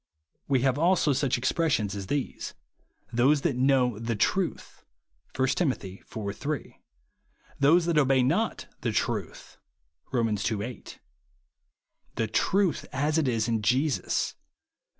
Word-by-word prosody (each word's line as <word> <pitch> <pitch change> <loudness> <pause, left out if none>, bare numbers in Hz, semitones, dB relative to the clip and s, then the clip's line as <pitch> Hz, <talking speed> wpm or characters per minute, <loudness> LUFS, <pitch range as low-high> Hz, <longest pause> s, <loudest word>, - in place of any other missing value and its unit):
We 135 -3 +2
have 135 +1 +1
also 170 -3 +3
such 130 -2 +1
exjDressions 130 - +1
as 100 -2 -5
these, 145 +2 -3 0.3
" - - -34
Those 135 +5 +3
that 150 -5 0
know 125 -3 +2
the 115 0 -2
truth,'' 180 - -1 0.5
(1 130 0 +2
Tim. 150 +1 +2
iv. 100 0 -7
3); 150 -3 -5 0.4
" - - -32
those 160 +5 +5
that 170 -3 +3
obey 135 -2 +3
not 175 - 0 0.2
the - - -1
truth'' - - -3 0.5
(Kom. 120 -4 +1
ii. - - 0
8j; 105 +3 -4 0.6
" - - -45
the 115 - 0
truth 185 - +1
as 150 +3 +1
it 150 - +1
is 115 -2 0
in 115 -2 0
Jesus," 130 +7 +1
(Eph. - - -27
130 Hz, 145 wpm, -27 LUFS, 115-150 Hz, 0.6 s, those